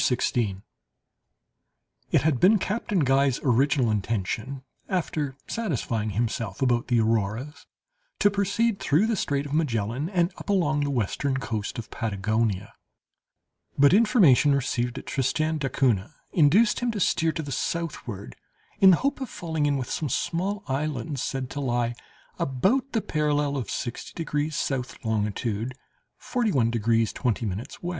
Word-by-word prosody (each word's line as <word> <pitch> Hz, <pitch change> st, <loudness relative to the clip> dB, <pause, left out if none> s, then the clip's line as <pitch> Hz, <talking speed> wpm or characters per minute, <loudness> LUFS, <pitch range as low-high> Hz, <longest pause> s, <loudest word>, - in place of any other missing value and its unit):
CHAPTER 125 Hz, -, +3 dB
16 105 Hz, -6 st, -1 dB, 1.5 s
It -, -, +4 dB
had 150 Hz, -5 st, +2 dB
been 205 Hz, +4 st, +6 dB
Captain 205 Hz, -2 st, -1 dB
Guy's 135 Hz, -1 st, +3 dB
original 130 Hz, -1 st, +3 dB
intention, 110 Hz, +5 st, -2 dB, 0.3 s
after 155 Hz, -7 st, -1 dB
satisfying 125 Hz, -, -2 dB
himself 115 Hz, -4 st, -2 dB
about 120 Hz, -3 st, +1 dB
the 120 Hz, -2 st, +3 dB
Auroras, 115 Hz, +6 st, -1 dB, 0.5 s
to 205 Hz, -, +4 dB
proceed 200 Hz, +2 st, +1 dB
through 155 Hz, +9 st, +2 dB
the 225 Hz, 0 st, +1 dB
Strait 140 Hz, -6 st, -1 dB
of 145 Hz, -, -6 dB
Magellan, 130 Hz, -1 st, 0 dB
and 180 Hz, -2 st, +1 dB
up -, -, -10 dB
along 160 Hz, -7 st, +2 dB
the 145 Hz, 0 st, 0 dB
western 130 Hz, +2 st, -1 dB
coast 110 Hz, -5 st, -3 dB
of 115 Hz, -, -7 dB
Patagonia; 105 Hz, -1 st, -1 dB, 1.0 s
but 140 Hz, +3 st, +6 dB
information 190 Hz, -, +5 dB
received 125 Hz, -2 st, -1 dB
at -, -, -7 dB
Tristan 155 Hz, +4 st, 0 dB
d'Acunha 130 Hz, -3 st, 0 dB, 0.2 s
induced 190 Hz, +8 st, +4 dB
him 245 Hz, -, 0 dB
to 210 Hz, -, -3 dB
steer 165 Hz, -3 st, +2 dB
to 160 Hz, -, -3 dB
the 140 Hz, -, -6 dB
southward, 130 Hz, -, -4 dB, 0.4 s
in 195 Hz, -, +8 dB
the 180 Hz, -, +6 dB
hope 280 Hz, 0 st, 0 dB
of 260 Hz, -, -4 dB
falling 160 Hz, -3 st, -2 dB
in 140 Hz, -1 st, +1 dB
with 130 Hz, -, -4 dB
some 155 Hz, -, -2 dB
small 190 Hz, -, -1 dB
islands 140 Hz, 0 st, -2 dB
said 135 Hz, -1 st, -2 dB
to 145 Hz, -, -4 dB
lie 120 Hz, -3 st, 0 dB, 0.5 s
about 210 Hz, -, +1 dB
the 225 Hz, -, +1 dB
parallel 150 Hz, -3 st, 0 dB
of 130 Hz, -4 st, -3 dB
60 120 Hz, -, -5 dB
degrees 155 Hz, -2 st, -2 dB, 0.2 s
S., 130 Hz, -1 st, -3 dB
longitude 110 Hz, +2 st, -2 dB, 0.4 s
41 195 Hz, -, 0 dB
degrees 115 Hz, 0 st, +1 dB
20' 120 Hz, -2 st, -1 dB
W. 100 Hz, +6 st, -4 dB
140 Hz, 145 wpm, -26 LUFS, 115-165 Hz, 1.5 s, in